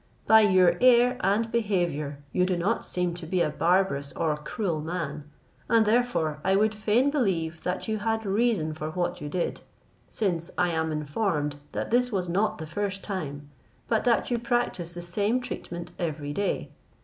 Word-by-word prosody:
By 220 0 +7
your 185 -4 +4
air 250 0 +6
and 225 +2 +1
behaviour 170 -10 -1
you 180 - +2
do 180 -1 +1
not 200 +7 0
seem 180 -1 -1
to 170 -1 -8
be 185 +2 0
a 150 - +1
barbarous 165 -4 +1
or 160 -3 0
cruel 160 +2 -3
man; 155 -3 -4 0.4
and 225 -1 +5
therefore 210 -10 +1
I 190 0 +3
would 215 +2 +3
fain 220 +6 +2
believe 170 - 0
that 180 +3 -3
you 215 -1 -1
had 225 +1 -1
reason 200 -6 +1
for 155 0 -5
what 175 +2 -2
you 145 - -4
did, 175 +3 -2 0.5
since 175 -6 -1
I 175 - +2
am 160 -1 -1
informed 150 -1 -1 0.2
that - - -3
this 245 +1 +3
was 185 -4 -1
not 200 +5 +1
the 160 - -6
first 195 +4 -3
time, 145 -7 -5 0.4
but 225 -2 +1
that 240 +1 +2
you 240 - +1
practise 235 -8 -1
the 175 0 -7
same 205 +7 0
treatment 175 -8 -6
every 150 -4 -3
day. 200 +5 -2
180 Hz, 175 wpm, -27 LUFS, 160-220 Hz, 0.5 s, By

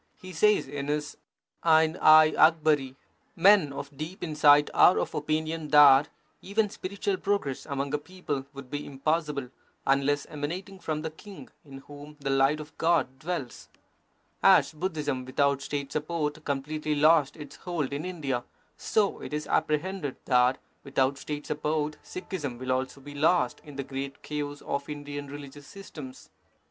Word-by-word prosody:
He 185 0 -10
says 210 +2 +3
in 140 0 -5
his 150 0 -2 0.5
Ain 160 0 +4
i 155 0 +7
Akbari: 155 -4 +3 0.4
Men 190 -4 +5
of 140 0 -7
deep 160 +8 -7
insight 150 -2 +4
are 180 - +6
of - - -2
opinion 155 +1 -2
that 145 -1 +7 0.3
even 205 +1 0
spiritual 200 0 -3
progress 195 -10 -2
among 140 -1 -3
a 150 - +1
people 145 -5 -5
would 140 -2 -11
be 145 0 -3
impossible, 145 -1 -2 0.4
unless 140 +1 +2
emanating 180 +7 -6
from 155 -3 -3
the 160 - -4
king, 195 +4 -12
in 135 -2 -11
whom 145 +1 -12
the 140 -1 -2
light 135 +3 +3
of 150 0 -10
God 155 -6 +1
dwells. 150 -6 -5 0.7
As - - +5
Budhism 150 -6 -3
without 140 +2 +1
State 140 -1 -4
support 155 -1 -3
completely 150 +2 -2
lost 150 -1 +4
its 145 -2 -10
hold 165 -6 -3
in 145 +2 -3
India, 145 -9 -3 0.3
so 210 -3 0
it - - -7
is 150 - -3
apprehended 160 -1 -1
that 125 0 +3 0.3
without 135 0 0
State 150 0 -5
sup 150 - -4
port 150 0 -1
Sikhism 165 -9 -5
will 130 +1 -3
also 130 +2 -2
be 145 +1 -10
lost 150 -2 +1
in 145 -2 -12
the 140 - -3
great 135 +1 -6
chaos 145 -1 -4
of 140 +1 -3
Indian 145 -1 -6
religious 145 0 -10
systems. 150 -9 -11
150 Hz, 155 wpm, -28 LUFS, 140-160 Hz, 0.7 s, i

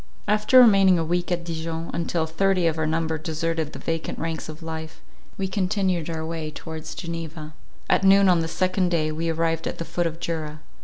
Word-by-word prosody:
After 210 +5 +5
remaining 195 -6 +7
a 165 - 0
week 175 +2 -1
at 175 -1 0
Dijon, 165 0 -4
until 170 -1 -1
thirty 185 +3 +1
of 160 -1 +1
our 160 - +1
number 160 0 -1
deserted 160 0 -2
the - - -8
vacant 165 0 -3
ranks 165 -1 -4
of 155 +2 -9
life, 160 0 -6 0.4
we 195 - -1
continued 185 -3 0
our 160 -1 -3
way 160 -1 -4
towards 160 +1 -7
Geneva. 165 -3 -6 0.3
At - - +3
noon 195 0 +6
on 180 -2 +5
the 165 - -1
second 185 +2 0
day 155 -3 +1
we 165 +2 -2
arrived 165 0 0
at - - -4
the 165 - -4
foot 175 0 -1
of 165 0 -6
Jura. 155 -3 -4
165 Hz, 200 wpm, -24 LUFS, 160-180 Hz, 0.4 s, remaining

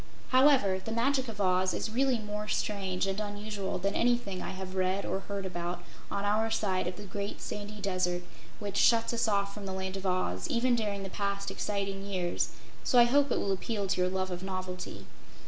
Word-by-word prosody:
However, 255 -8 +5
"The 225 - -4
Magic 260 +3 +2
of 220 -2 -7
Oz" 185 -1 +3
is 220 - -2
really 260 +1 +3
more 210 -1 -4
strange 195 -3 0
and 195 +1 -1
unusual 205 -1 -3
than 195 +2 0
anything 235 -6 +1
I - - -4
have 190 0 -6
read 190 +1 +1
or 190 - -1
heard 200 0 -5
about 175 -1 -3 0.3
on 200 - -1
our 215 +2 +2
side 195 -5 +1
of 180 - -3
The 205 - -8
Great 200 +1 -4
Sandy 210 0 -5
Desert 185 -3 0 0.3
which 200 -1 -4
shuts 230 0 +5
us 230 -1 +1
off 200 -1 +1
from 200 -1 -6
The 190 - -3
Land 190 0 -3
of 195 0 -3
Oz, 185 - 0
even 250 -3 +3
during 205 -3 -1
the 195 - -5
past 200 -1 -1
exciting 195 -1 -2
years, 185 -3 -1 0.3
so 250 - +3
I 240 - +10
hope 280 +4 +4
it - - +2
will 200 - 0
appeal 200 +2 -1
to 185 -1 +1
your 180 - +3
love 185 0 -1
of 175 0 -4
novelty. 185 -1 -5
200 Hz, 205 wpm, -31 LUFS, 185-215 Hz, 0.3 s, I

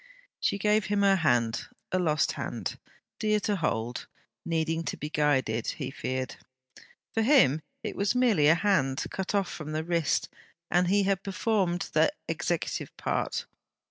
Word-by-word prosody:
She - - +1
gave 210 +1 +2
him 205 0 +1
her 195 -1 +5
hand: 120 -8 +1 0.2
a 185 - +1
lost 155 -4 +2
hand, - - -4 0.4
dear 215 -1 +2
to 205 0 0
hold, 120 -7 -2 0.4
needing 165 0 -1
to - - -3
be 150 - -5
guided, 130 -7 +1
he 135 -3 -3
feared. 130 -1 -3 0.8
For 225 - +1
him, 220 - +5 0.2
it - - -4
was 200 +3 +1
merely 225 -12 +4
a 160 - +7
hand, 165 -9 +1
cut 190 +2 -2
off 200 -2 +1
from 155 -1 -6
the 155 +1 -1
wrist; 170 -2 +1 0.4
and 180 0 +3
he 200 +2 +3
had 195 -1 +1
performed 195 -2 0
that 295 - +3
executive - - -2
part! - - -1
175 Hz, 155 wpm, -28 LUFS, 150-200 Hz, 0.8 s, a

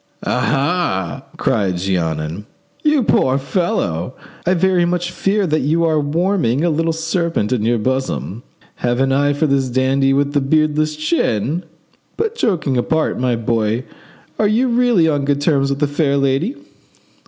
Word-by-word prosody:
"Ah! 135 - -1
ah!" - - -17
cried 95 -5 0
Jeannin. 85 0 -2 0.3
"You 300 -4 +2
poor 130 -10 +2
fellow! 130 - -2 0.3
I 185 - +3
very 185 0 +2
much 175 0 -1
fear 200 +2 0
that 155 -2 +1
you 160 +5 +1
are 160 -2 +2
warming 155 - 0
a 175 - +2
little 165 +2 0
serpent 165 - -1
in 120 - 0
your 115 +2 +1
bosom. 130 -2 -2 0.4
Have 120 0 -1
an 135 0 +2
eye 145 +1 +2
to 145 +3 0
this 135 -3 +1
dandy 135 +2 +2
with 140 +1 +1
the 145 - +2
beardless 155 +2 +1
chin! 155 - -1 0.5
But 450 0 -1
joking 170 - 0
apart, 155 +5 0
my 125 -1 +1
boy, 115 0 -1 0.6
are 215 - +3
you 235 +5 +2
really 235 -8 +3
on 145 -3 +1
good 140 0 0
terms 140 -2 +1
with 140 - -1
the 150 - +1
fair 145 -1 0
lady?" 140 - 0
145 Hz, 160 wpm, -18 LUFS, 125-170 Hz, 0.6 s, I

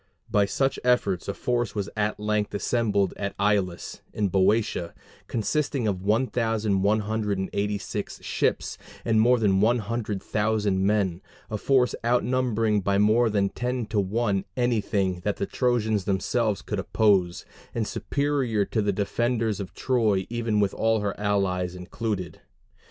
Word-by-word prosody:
By 105 -2 +4
such 135 +4 0
efforts 110 -8 +1
a 100 - -1
force 120 -2 -1
was 100 -2 -2
at 105 0 -1
length 105 -1 -1
assembled 100 -3 +1
at 100 0 -3
Aulis 100 -3 0
in 105 -2 0
Boeotia, 95 -2 +1 0.3
consisting 135 +1 -1
of 95 -3 -1
1,186 105 -2 0
ships - - -1 0.3
and 110 -2 +3
more 125 +2 +5
than 100 -4 +2
one 120 +3 +4
hundred 105 -2 -3
thousand 105 -3 +1
men 100 -4 +1 0.3
a 105 - -1
force 130 0 +3
outnumbering 120 -3 +1
by 100 +1 +1
more 110 +3 +4
than 100 -2 +1
ten 125 +1 -2
to 110 -2 +1
one 100 0 0
anything 105 -6 0
that 100 +3 -1
the - - -1
Trojans 110 -5 0
themselves 105 +2 0
could - - -3
oppose, 95 -5 +2 0.3
and 115 -3 -1
superior 135 -7 0
to 110 - -1
the 100 0 +1
defenders 110 +2 0
of 95 -2 -7
Troy 110 -7 +1
even 115 -3 0
with 100 -1 +2
all 110 -1 +1
her 100 -1 -1
allies 95 -3 0
included. 90 +1 -4
105 Hz, 140 wpm, -26 LUFS, 100-115 Hz, 0.3 s, more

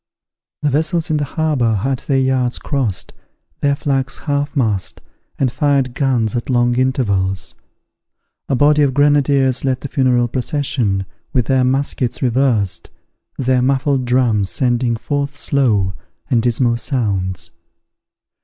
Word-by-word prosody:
The 145 - +2
vessels 160 +3 0
in 155 - +2
the 145 - -1
harbour 140 -7 0
had 130 +6 -1
their 135 - -1
yards 130 -2 +1
crossed, 125 -10 -2 0.5
their 140 0 +1
flags 135 -2 -1
half 145 -1 -2
mast, 110 -8 -1 0.4
and 130 -3 +1
fired 135 -1 +1
guns 125 -6 0
at 120 - -3
long 120 -1 +2
intervals. 100 - 0 1.0
A 135 - +2
body 150 +3 +4
of 135 -3 +2
grenadiers 140 -2 +3
led 130 -2 0
the - - -4
funeral 125 -4 +2
procession, 120 -6 -1 0.3
with 125 -4 +2
their 130 +1 +2
muskets 130 -1 -1
reversed, 120 -6 0 0.5
their 130 -1 +1
muffled 135 0 +1
drums 120 -6 +2
sending 120 -2 0
forth 140 +4 -3
slow 110 -11 +1 0.4
and 120 -3 +3
dismal 120 0 +1
sounds. 95 - -2
130 Hz, 130 wpm, -18 LUFS, 120-140 Hz, 1.0 s, body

